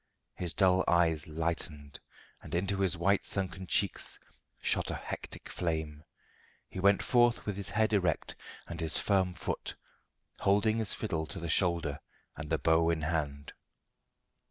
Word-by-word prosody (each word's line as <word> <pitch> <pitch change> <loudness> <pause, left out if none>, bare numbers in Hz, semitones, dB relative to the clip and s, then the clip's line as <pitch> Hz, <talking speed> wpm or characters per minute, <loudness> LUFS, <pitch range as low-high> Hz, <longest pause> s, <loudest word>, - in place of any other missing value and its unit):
His 90 -2 -2
dull 95 -1 +4
eyes 80 -3 +3
lightened, 80 -2 -3 0.4
and - - -6
into 95 +3 0
his 95 -3 +1
white 95 +4 +2
sunken 95 -1 -3
cheeks 100 +1 0 0.4
shot - - +1
a - - -2
hectic - - -7
flame. 80 -3 -3 0.6
He - - -7
went 100 +1 +4
forth 120 -1 +3
with 105 - -2
his 100 0 -2
head 110 0 +1
erect 90 -5 +1 0.3
and 85 0 -6
with 80 - -1
firm 95 -3 +1
foot, - - -4 0.6
holding 105 +3 +3
his 110 -3 +1
fiddle 80 -7 -2
to 75 - -5
the 85 -1 -4
shoulder 85 -5 +2 0.4
and 75 -2 -7
the - - +2
bow 80 0 +3
in 80 -1 0
hand. 75 -3 -2
85 Hz, 150 wpm, -31 LUFS, 80-100 Hz, 0.6 s, dull